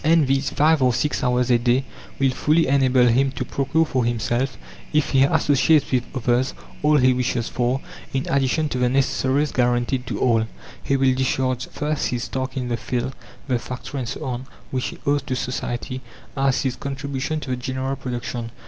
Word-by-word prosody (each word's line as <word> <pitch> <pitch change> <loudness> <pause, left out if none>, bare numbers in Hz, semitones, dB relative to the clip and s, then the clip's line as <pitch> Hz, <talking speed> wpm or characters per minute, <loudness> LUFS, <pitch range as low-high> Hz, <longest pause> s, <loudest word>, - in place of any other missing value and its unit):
And 160 -1 +4
these 135 +2 +1
5 155 0 +3
or 125 -1 +4
6 150 +2 0
hours 125 0 +2
a 120 - +5
day 125 +3 +2 0.3
will 135 -1 +3
fully 155 +5 +2
enable 130 -2 +4
him 130 +3 +3
to - - -3
procure 140 +4 +1
for 130 -5 0
himself, 120 +2 -1 0.3
if 150 -1 +1
he 135 - +4
associates 145 +2 +3
with 125 -2 +1
others, 125 +1 +1 0.3
all 150 +1 +4
he 130 -1 +5
wishes 125 -2 -1
for, 125 +2 0 0.3
in 135 0 -2
addition 140 +3 +1
to 130 - -2
the 125 0 +3
necessaries 135 +2 +1
guaranteed 125 +1 +1
to - - -3
all. 115 -3 +2 0.3
He 135 - +1
will 135 -1 +3
discharge 130 -1 0
first 150 0 -2
his 120 -1 -2
task 130 0 -3
in 125 -1 -2
the 120 - 0
field, 125 +2 -2 0.3
the 125 -3 +1
factory, 125 +4 -6
and 120 -3 -3
so - - -5
on, 130 0 -4 0.2
which 130 -1 -1
he - - -7
owes 145 0 +2
to 130 -1 -3
society 125 0 -3 0.3
as 135 -1 +1
his 130 -2 -1
contribution 140 +2 -3
to 130 - -5
the - - +1
general 130 +2 -3
production. 120 -2 -4
130 Hz, 190 wpm, -22 LUFS, 125-140 Hz, 0.3 s, a